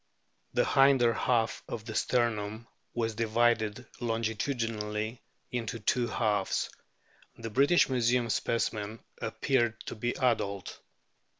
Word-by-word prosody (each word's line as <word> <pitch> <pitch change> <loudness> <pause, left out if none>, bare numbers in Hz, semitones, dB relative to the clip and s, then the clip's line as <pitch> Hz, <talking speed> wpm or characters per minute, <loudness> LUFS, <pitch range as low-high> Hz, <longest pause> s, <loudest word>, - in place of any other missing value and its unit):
The - - +4
hinder 135 -4 +5
half 115 -1 +1
of 110 -2 -5
the 110 - -5
sternum 110 -2 0 0.3
was 115 -2 0
divided 115 +1 +1
longitudinally 115 -1 -2 0.3
into 115 -2 -3
two 120 +3 +1
halves; 105 -3 0 0.7
the 115 -1 -6
British 140 +9 +5
Museum 125 -1 +2
specimen 110 -1 -1 0.2
appeared 120 -5 0
to - - -6
be 120 +2 -1
adult. 100 -6 0
115 Hz, 105 wpm, -30 LUFS, 110-120 Hz, 0.7 s, hinder